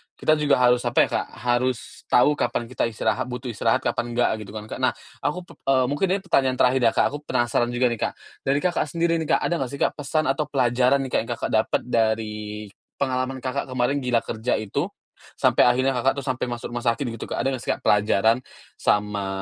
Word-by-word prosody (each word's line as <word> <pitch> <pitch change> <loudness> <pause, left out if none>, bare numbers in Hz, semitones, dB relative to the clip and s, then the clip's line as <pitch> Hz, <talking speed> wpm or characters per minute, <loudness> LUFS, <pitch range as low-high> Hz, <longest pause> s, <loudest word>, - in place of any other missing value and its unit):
kita 155 - +2
juga 145 -2 +3
harus 125 0 +4
apa 120 - +4
ya - - -15
Kak, - - -5
harus 125 0 -1
tahu 125 +4 +5
kapan 120 0 0
kita 120 - 0
istirahat, 120 +3 -1
butuh 125 0 -5
istirahat, 115 +4 +1
kapan 120 0 -2
enggak 120 - +3
gitu 100 - -11
kan 105 -1 -6
Kak - - -5
nah - - +3 0.3
aku 175 +5 -1
pep - - -15
eee, 130 -1 +4
mungkin 145 +7 +1
ini - - -2
pertanyaan 135 -7 +2
terakhir 130 +1 +4
ya - - +4
Kak, - - +4
aku 145 - -4
penasaran 120 -1 +1
juga 125 +1 +3
nih 115 - -3
Kak, - - 0 0.3
dari 140 +2 +3
Kakak, 180 -3 +1
sendiri 170 +1 0
nih 160 - -3
Kak - - +1
ada 175 - 0
enggak 130 -1 -3
sih - - -10
Kak - - +2
pesan 155 +2 0
atau 150 +1 -2
pelajaran 130 0 +2
nih 130 - -6
Kak - - +2
yang 115 - -12
Kakak - - -4
dapet 110 0 +2
dari 105 -2 -1 0.3
pengalaman 130 -1 -1
Kakak 130 0 -2
kemarin 130 +2 0
gila 125 -3 +1
kerja 115 +2 -1
itu, 105 -2 -2 0.5
sampai - - +4
akhirnya 130 +2 +3
Kakak 130 +3 +2
tuh 135 - -6
sampai 130 -2 -1
masuk 120 0 -5
rumah 120 - -3
sakit 115 +4 +1
gitu 115 -1 -5
Kak - - -3
ada 135 - +1
enggak 125 - -8
sih - - 0
Kak - - -18
pelajaran, 105 +3 +3 0.4
sama 105 -1 +1
125 Hz, 225 wpm, -24 LUFS, 115-135 Hz, 0.5 s, tahu